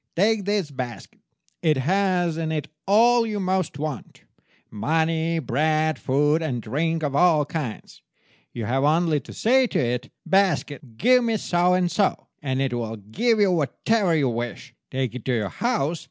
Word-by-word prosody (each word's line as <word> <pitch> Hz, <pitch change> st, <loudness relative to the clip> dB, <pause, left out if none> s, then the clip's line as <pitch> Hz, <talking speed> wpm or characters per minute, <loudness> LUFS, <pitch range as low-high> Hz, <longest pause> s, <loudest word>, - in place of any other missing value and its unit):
Take 205 Hz, +2 st, +2 dB
this 200 Hz, -7 st, -1 dB
basket. 125 Hz, -3 st, -7 dB, 0.4 s
It 155 Hz, -4 st, +2 dB
has 180 Hz, +3 st, +1 dB
in 160 Hz, -1 st, -2 dB
it 155 Hz, -2 st, -3 dB, 0.2 s
all 235 Hz, +4 st, +5 dB
you 215 Hz, -2 st, -3 dB
most 185 Hz, -5 st, -1 dB
want—money, 160 Hz, +3 st, -3 dB
bread, 155 Hz, +1 st, 0 dB
food, 145 Hz, +4 st, +1 dB
and 135 Hz, -7 st, -2 dB
drink 160 Hz, +8 st, -2 dB
of 140 Hz, -2 st, -1 dB
all 160 Hz, -2 st, +4 dB
kinds. 145 Hz, -8 st, -6 dB, 0.5 s
You 115 Hz, -, -5 dB
have 130 Hz, +5 st, 0 dB
only 155 Hz, +1 st, +2 dB
to -, -, -12 dB
say 255 Hz, +3 st, +3 dB
to -, -, -2 dB
it, 125 Hz, +1 st, -1 dB, 0.2 s
'Basket, 150 Hz, -, 0 dB
give 250 Hz, +2 st, +4 dB
me 230 Hz, -2 st, +1 dB
so 180 Hz, -2 st, +2 dB
and 180 Hz, -1 st, +1 dB
so,' 200 Hz, -2 st, 0 dB, 0.2 s
and 130 Hz, -2 st, -2 dB
it 135 Hz, -2 st, -1 dB
will 115 Hz, -2 st, -3 dB
give 165 Hz, -, 0 dB
you 200 Hz, -2 st, +4 dB
whatever 180 Hz, +4 st, +1 dB
you 140 Hz, -5 st, +2 dB
wish. 120 Hz, 0 st, -5 dB, 0.2 s
Take 130 Hz, -3 st, -2 dB
it 125 Hz, -3 st, -7 dB
to 130 Hz, -, 0 dB
your 105 Hz, -4 st, -1 dB
house. 175 Hz, -, -1 dB
160 Hz, 165 wpm, -24 LUFS, 130-190 Hz, 0.5 s, all